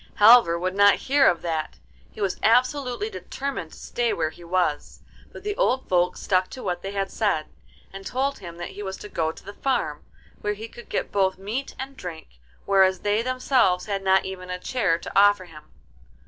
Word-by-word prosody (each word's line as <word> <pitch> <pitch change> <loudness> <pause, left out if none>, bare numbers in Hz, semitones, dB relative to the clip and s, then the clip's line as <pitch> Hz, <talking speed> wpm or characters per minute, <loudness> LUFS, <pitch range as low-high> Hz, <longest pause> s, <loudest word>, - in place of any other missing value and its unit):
Halvor 210 -5 +7
would 185 +2 -2
not 200 0 +6
hear 275 +1 +4
of 170 - +2
that, 160 -2 -3 0.3
he - - -14
was 195 -3 -1
absolutely 255 - +2
determined 275 - -5
to - - -13
stay 240 -1 -1
where 160 -1 -1
he 175 - -15
was; 170 -3 -1 0.3
but - - -11
the 415 0 -2
old 260 +1 +1
folks 180 -1 +1
stuck 185 -1 +1
to 260 - -9
what 175 -1 -2
they 195 - -5
had 195 -1 -2
said, 200 -9 0 0.5
and 195 0 -8
told 270 +6 -2
him 170 -3 -9
that 175 - -6
he 205 - -9
was 190 -1 -5
to - - -9
go 160 -4 -1
to - - -15
the 200 - -8
farm, 205 - -1 0.4
where 210 - -1
he 215 +2 -8
could 240 +1 -13
get - - -2
both 190 -2 +1
meat 220 +8 -4
and 270 +1 -6
drink, 160 - -9 0.3
whereas 190 -2 +4
they 205 +1 +1
themselves 255 -7 +2
had 200 -2 -2
not 190 0 +3
even 185 -1 -7
a 180 - -3
chair 195 -4 0
to - - -8
offer 205 -1 +5
him. 155 -3 -14
195 Hz, 205 wpm, -24 LUFS, 180-240 Hz, 0.5 s, Halvor